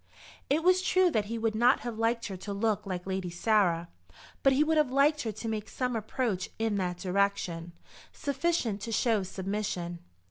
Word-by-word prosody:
It 305 Hz, +4 st, +2 dB
was 365 Hz, +1 st, +5 dB
true 370 Hz, -1 st, +3 dB
that 215 Hz, -7 st, +1 dB
he 230 Hz, +2 st, -4 dB
would 225 Hz, -1 st, 0 dB
not 240 Hz, +4 st, +4 dB
have 235 Hz, -2 st, -5 dB
liked 230 Hz, +1 st, +1 dB
her 195 Hz, -, -4 dB
to 200 Hz, +2 st, -6 dB
look 210 Hz, 0 st, 0 dB
like 180 Hz, -2 st, -4 dB
Lady 190 Hz, -1 st, -2 dB
Sarah, 175 Hz, -2 st, +2 dB, 0.5 s
but 270 Hz, -, +5 dB
he 270 Hz, +3 st, +4 dB
would 315 Hz, +1 st, +1 dB
have 300 Hz, -4 st, +3 dB
liked 290 Hz, +3 st, +3 dB
her 225 Hz, -, -2 dB
to 220 Hz, +3 st, -6 dB
make 220 Hz, -1 st, -3 dB
some 250 Hz, -2 st, -2 dB
approach 220 Hz, -3 st, -2 dB
in 220 Hz, -2 st, 0 dB
that 180 Hz, -2 st, -1 dB
direction, 180 Hz, -3 st, -1 dB, 0.4 s
sufficient 280 Hz, -7 st, -1 dB
to 230 Hz, +2 st, -5 dB
show 225 Hz, -1 st, +2 dB
submission. 190 Hz, -2 st, -3 dB
220 Hz, 185 wpm, -29 LUFS, 190-250 Hz, 0.5 s, was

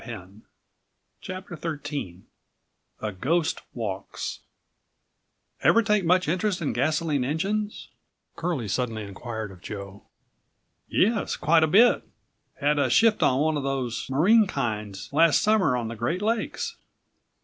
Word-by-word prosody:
134 105 Hz, -3 st, -10 dB, 0.7 s
CHAPTER 185 Hz, -1 st, -7 dB
XIIIA 140 Hz, -, -8 dB
GHOST 160 Hz, -, 0 dB
WALKS 100 Hz, -5 st, -4 dB, 1.2 s
"Ever 230 Hz, -, +5 dB
take 210 Hz, -2 st, +2 dB
much 180 Hz, +1 st, +3 dB
interest 185 Hz, +3 st, 0 dB
in 155 Hz, -, -2 dB
gasoline 150 Hz, -2 st, 0 dB
engines?" 200 Hz, +10 st, -2 dB, 0.5 s
Curlie 165 Hz, -10 st, -2 dB
suddenly 110 Hz, 0 st, -2 dB
inquired 110 Hz, +1 st, -6 dB
of 90 Hz, -2 st, -14 dB
Joe. 100 Hz, 0 st, -8 dB, 0.9 s
"Yes, 220 Hz, +1 st, +1 dB
quite 160 Hz, +2 st, +3 dB
a -, -, +4 dB
bit; 220 Hz, +10 st, +5 dB, 0.5 s
had 145 Hz, 0 st, +1 dB
a -, -, +2 dB
shift 225 Hz, -1 st, +4 dB
on 130 Hz, +2 st, +3 dB
one 155 Hz, 0 st, +1 dB
of -, -, -2 dB
those 135 Hz, -4 st, -2 dB
marine 200 Hz, +11 st, +4 dB
kinds 105 Hz, -, -3 dB
last 160 Hz, +1 st, +5 dB
summer 195 Hz, -12 st, +3 dB
on 120 Hz, -2 st, -3 dB
the 115 Hz, -, -5 dB
Great 165 Hz, -, -2 dB
Lakes." 225 Hz, 0 st, -2 dB
145 Hz, 125 wpm, -26 LUFS, 115-180 Hz, 1.2 s, Ever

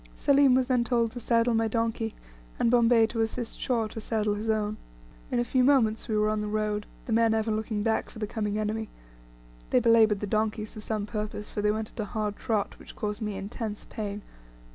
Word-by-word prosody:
Selim 275 Hz, -2 st, +5 dB
was 260 Hz, 0 st, +3 dB
then 250 Hz, -2 st, +2 dB
told 235 Hz, -2 st, +1 dB
to 245 Hz, -, -6 dB
saddle 230 Hz, 0 st, +2 dB
my 225 Hz, 0 st, +2 dB
donkey, 225 Hz, 0 st, -1 dB, 0.4 s
and 230 Hz, -, +2 dB
Bombay 235 Hz, -1 st, +5 dB
to 225 Hz, 0 st, -2 dB
assist 225 Hz, +1 st, -3 dB
Shaw 235 Hz, -3 st, 0 dB
to 225 Hz, -, -7 dB
saddle 215 Hz, -1 st, 0 dB
his 210 Hz, +2 st, -3 dB
own. 215 Hz, -1 st, 0 dB, 0.5 s
In -, -, 0 dB
a 240 Hz, -, +1 dB
few 255 Hz, +1 st, +2 dB
moments 250 Hz, -5 st, +3 dB
we 215 Hz, -, 0 dB
were 210 Hz, 0 st, +3 dB
on 215 Hz, 0 st, 0 dB
the 210 Hz, -, -3 dB
road, 210 Hz, 0 st, -1 dB, 0.2 s
the 230 Hz, -, -2 dB
men 225 Hz, 0 st, +4 dB
ever 220 Hz, 0 st, 0 dB
looking 215 Hz, -1 st, -2 dB
back 220 Hz, 0 st, 0 dB
for -, -, -13 dB
the 215 Hz, -, -2 dB
coming 210 Hz, -1 st, -2 dB
enemy; 215 Hz, +1 st, -2 dB, 0.8 s
they -, -, +4 dB
belabored 225 Hz, -3 st, +5 dB
the 210 Hz, -, -2 dB
donkeys 215 Hz, +1 st, -1 dB
to 215 Hz, -, -8 dB
some 215 Hz, -1 st, -2 dB
purpose, 210 Hz, -1 st, -5 dB
for 210 Hz, -, -2 dB
they 210 Hz, -, +2 dB
went 215 Hz, 0 st, -2 dB
at -, -, -15 dB
a 215 Hz, -, 0 dB
hard 210 Hz, 0 st, -2 dB
trot, 215 Hz, -3 st, -2 dB
which -, -, -12 dB
caused 210 Hz, +1 st, -3 dB
me 210 Hz, -2 st, -2 dB
intense 210 Hz, +2 st, -5 dB
pain. 205 Hz, -1 st, -4 dB
220 Hz, 220 wpm, -28 LUFS, 210-230 Hz, 0.8 s, Selim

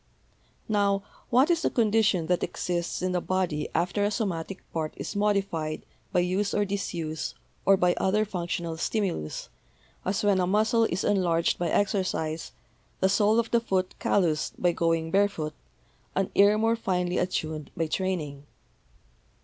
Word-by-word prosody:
Now, 200 Hz, -2 st, +2 dB, 0.3 s
what 260 Hz, +7 st, +4 dB
is 335 Hz, -1 st, +2 dB
the -, -, +2 dB
condition 215 Hz, -6 st, +2 dB
that 180 Hz, +1 st, +1 dB
exists 175 Hz, 0 st, -2 dB
in 185 Hz, -, +1 dB
the 180 Hz, -1 st, 0 dB
body 175 Hz, -6 st, -1 dB
after 180 Hz, +5 st, +1 dB
a 205 Hz, -, +3 dB
somatic 195 Hz, -4 st, -3 dB
part 160 Hz, -2 st, -2 dB
is -, -, -5 dB
modified 195 Hz, -7 st, 0 dB, 0.3 s
by 180 Hz, -, +3 dB
use 190 Hz, +3 st, 0 dB
or 205 Hz, -, +2 dB
disuse 170 Hz, -5 st, -3 dB, 0.3 s
or 195 Hz, 0 st, +7 dB
by 180 Hz, -1 st, +3 dB
other 210 Hz, +3 st, +2 dB
functional 170 Hz, -4 st, -3 dB
stimulus, 175 Hz, -, -2 dB, 0.5 s
as 190 Hz, +3 st, -1 dB
when 200 Hz, -2 st, +3 dB
a 180 Hz, -, +1 dB
muscle 220 Hz, +4 st, +3 dB
is 190 Hz, -2 st, -1 dB
enlarged 175 Hz, -5 st, +2 dB
by 175 Hz, -1 st, 0 dB
exercise, 185 Hz, -5 st, 0 dB, 0.5 s
the 190 Hz, -, +3 dB
sole 210 Hz, +2 st, +3 dB
of 235 Hz, -1 st, +1 dB
the 235 Hz, -, +3 dB
foot 185 Hz, -4 st, -1 dB
calloused 165 Hz, -6 st, +1 dB
by 175 Hz, -, +3 dB
going 165 Hz, -1 st, 0 dB
bare 200 Hz, +1 st, +4 dB
foot, 155 Hz, -5 st, -5 dB, 0.6 s
an 195 Hz, 0 st, 0 dB
ear 205 Hz, +1 st, +5 dB
more 225 Hz, +1 st, +2 dB
finely 180 Hz, -5 st, -1 dB
attuned 155 Hz, -5 st, -2 dB
by 165 Hz, -, +1 dB
training? 155 Hz, -5 st, -3 dB
185 Hz, 155 wpm, -27 LUFS, 165-205 Hz, 0.6 s, or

